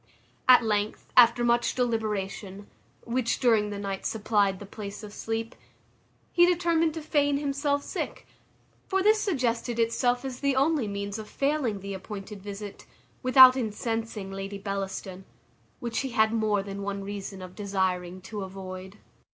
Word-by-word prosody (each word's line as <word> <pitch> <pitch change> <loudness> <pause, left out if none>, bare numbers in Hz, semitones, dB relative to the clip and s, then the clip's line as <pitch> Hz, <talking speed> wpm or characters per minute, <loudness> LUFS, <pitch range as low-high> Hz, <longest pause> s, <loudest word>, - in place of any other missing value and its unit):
At 250 -1 +9
length, 210 -1 -2
after 240 0 +7
much 240 0 +2
deliberation, 210 -4 -2 0.4
which 235 0 -1
during 220 -4 +3
that 205 - -5
night 195 -1 -4
supplied 205 -3 +1
the 205 - -9
place 205 +1 -8
of 205 -1 -9
sleep, 225 +1 -3 0.8
he 345 - +5
determined 335 -2 +2
to 320 - -5
feign 290 -2 +2
himself 285 0 0
sick: - - -5 0.6
for 385 -1 +1
this 430 +1 +4
suggested 240 - -1
itself 245 +2 +1
as 255 -2 -5
the 280 -1 +1
only 280 -3 +2
means 200 +1 -4
of 215 - -8
failing 275 -8 0
the 200 +1 -5
appointed 195 +1 -7
visit, 205 0 -8 0.3
without 255 0 +9
incensing 225 -3 -3
Lady 195 +1 -5
Bellaston, 195 -1 -5 0.6
which 235 -3 -2
he 270 - -2
had 220 -2 +2
more 215 -3 +1
than 200 0 -6
one 200 0 -3
reason 195 -1 -6
of 180 0 -9
desiring 185 -3 -2
to 205 +2 -6
avoid. 190 0 -8
220 Hz, 150 wpm, -27 LUFS, 200-255 Hz, 0.8 s, At